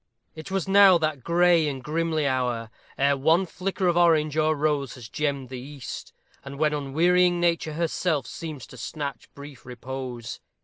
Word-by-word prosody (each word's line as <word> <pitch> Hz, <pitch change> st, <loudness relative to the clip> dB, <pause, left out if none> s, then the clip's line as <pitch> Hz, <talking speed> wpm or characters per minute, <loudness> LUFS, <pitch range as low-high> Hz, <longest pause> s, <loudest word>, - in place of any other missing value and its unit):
It 155 Hz, +2 st, -9 dB
was 190 Hz, -2 st, -2 dB
now 195 Hz, -2 st, +7 dB
that 155 Hz, -5 st, -2 dB
gray 170 Hz, -1 st, +3 dB
and 135 Hz, -3 st, -4 dB
grimly 160 Hz, 0 st, -1 dB
hour 125 Hz, -4 st, -1 dB, 0.3 s
ere 140 Hz, +1 st, +3 dB
one 160 Hz, +7 st, +3 dB
flicker 185 Hz, +1 st, -2 dB
of 175 Hz, -, +2 dB
orange 160 Hz, -4 st, +3 dB
or 155 Hz, 0 st, +2 dB
rose 145 Hz, -2 st, -1 dB
has 120 Hz, -4 st, -10 dB
gemmed 140 Hz, -1 st, -2 dB
the 130 Hz, -1 st, -6 dB
east, 135 Hz, -3 st, -8 dB, 0.3 s
and 140 Hz, 0 st, -8 dB
when 150 Hz, 0 st, +1 dB
unwearying 175 Hz, +5 st, +2 dB
Nature 170 Hz, -2 st, 0 dB
herself 160 Hz, -3 st, -1 dB
seems 155 Hz, -7 st, -7 dB
to 125 Hz, -, -14 dB
snatch 140 Hz, +4 st, -6 dB
brief 140 Hz, -2 st, -11 dB
repose. 125 Hz, -1 st, -7 dB
150 Hz, 165 wpm, -25 LUFS, 135-170 Hz, 0.3 s, now